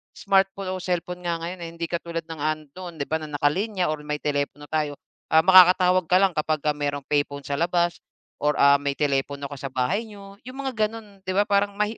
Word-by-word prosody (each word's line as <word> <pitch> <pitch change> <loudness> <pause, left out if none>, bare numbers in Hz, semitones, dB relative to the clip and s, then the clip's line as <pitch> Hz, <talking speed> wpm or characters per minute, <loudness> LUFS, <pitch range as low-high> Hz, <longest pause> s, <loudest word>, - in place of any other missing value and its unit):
smartphone 195 -1 +1
o 185 - -3
selpon 180 0 -3
nga 170 -1 0
ngayon, 175 +2 -5
eh, 170 -1 -6
hindi 170 0 -3
katulad 170 -1 -3
ng, 160 -1 -8
ah, 155 +1 +1
amin 155 -1 -17
noon 180 -2 -8
'di 140 - -2
ba, 160 - +1
na 155 - -7
nakalinya 180 +6 0
or 155 -1 -4
may 150 0 -3
telepono 145 0 -2
tayo. 155 -2 0 0.4
Ah, 160 0 +5
makakatawag 185 -1 +7
ka 180 - +5
lang 195 -2 +3
kapagka 155 -1 0
merong 145 -1 -3
payphone 145 -1 -1
sa 145 - -3
labas 175 0 0 0.4
or, 150 0 +1
ah, 140 0 +6
may 140 -1 -2
telepono 140 0 -1
ka 145 - -7
sa 135 - -5
bahay 130 - -1
niyo, 200 -1 -12
yung 255 +1 -9
mga 220 -5 0
ganun. 210 -3 -12
'Di 185 - -8
ba, 205 - +4
parang 200 0 +1
may 210 +2 -1
170 Hz, 220 wpm, -24 LUFS, 145-190 Hz, 0.4 s, makakatawag